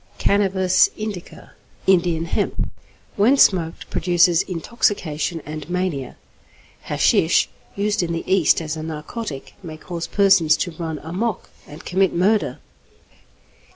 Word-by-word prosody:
=Cannabis 190 -2 +3
Indica= 210 -5 -7 0.3
(Indian 175 -3 +2
Hemp). 170 - -2 0.5
When 235 +8 +4
smoked, 170 -9 +2
produces 175 0 +3
intoxication 170 -4 -2
and 155 0 -7
mania. 175 -7 -3 0.7
Hashish, - - +3 0.3
used 210 +1 0
in 170 -1 -2
the 165 0 -3
East 185 -4 +3
as 155 0 -4
a 160 - -6
narcotic, 155 - -6
may 160 -4 -8
cause 170 +1 -6
persons 195 -6 +4
to 175 - -2
run 160 -1 -5
'amok' 190 +6 -3 0.2
and 150 - -12
commit 190 0 +1
murder. 205 +5 +1
175 Hz, 120 wpm, -21 LUFS, 160-195 Hz, 0.7 s, When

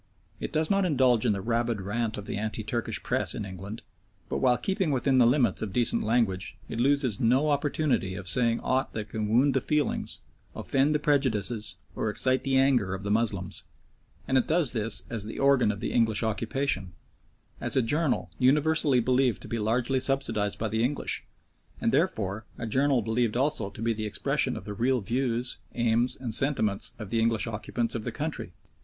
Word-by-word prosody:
It - - -4
does 155 +3 0
not 195 0 +3
indulge 130 -9 +3
in - - +3
the 100 - -3
rabid 115 0 0
rant 110 +3 -2
of 105 - -7
the - - -4
anti 110 +1 -3
Turkish 115 +2 -2
Press - - 0
in - - -4
England, 95 +3 -8 0.5
but - - -1
while 125 -2 +3
keeping 190 -3 -1
within 135 -1 +2
the 120 - +6
limits 120 -5 +2
of 110 - -3
decent 120 -2 +3
language 105 -5 0
it 115 - -5
loses 130 -3 +2
no 130 +5 +3
opportunity 145 -9 0
of 100 -1 -7
saying 115 +4 +3
aught 130 +1 0
that 110 -1 -5
can 110 -1 -3
wound 130 +5 +4
the 135 - +1
feelings, 150 +2 -1 0.3
offend 140 +3 +1
the - - +5
prejudices, 120 - +1 0.2
or 110 - -1
excite 130 +5 +1
the 135 -1 +1
anger 125 -8 +2
of 95 - -8
the 100 - -2
Moslems, 105 -5 -1 0.6
and 130 - +3
it - - -2
does 160 -6 +3
this 115 -1 0
as 110 -3 -4
the 110 - -7
organ 135 -5 +4
of 100 - -7
the - - -2
English 115 -2 +2
occupation, 110 -3 -1 0.7
as - - 0
a - - +5
journal 145 +4 0
universally 145 0 +3
believed 125 -2 +2
to - - -9
be 115 - -3
largely 120 +5 +1
subsidised 130 -7 -1
by 110 - -2
the 110 +2 0
English, 140 +4 -1 0.5
and - - +1
therefore 100 +1 0
a 120 - -4
journal 130 +2 +2
believed 115 +1 0
also 135 -6 0
to 100 +3 -8
be 115 0 +1
the 110 0 -4
expression 105 - -1
of - - -9
the 105 - -5
real 125 +4 +1
views, 120 +2 -2 0.2
aims, 120 +1 +1
and 120 -4 -3
sentiments 110 -7 0
of 105 -4 -8
the 115 - +1
English 115 -1 +1
occupants 115 +1 -3
of 115 - -3
the 120 - -3
country. 150 - -4
120 Hz, 195 wpm, -27 LUFS, 110-135 Hz, 0.7 s, the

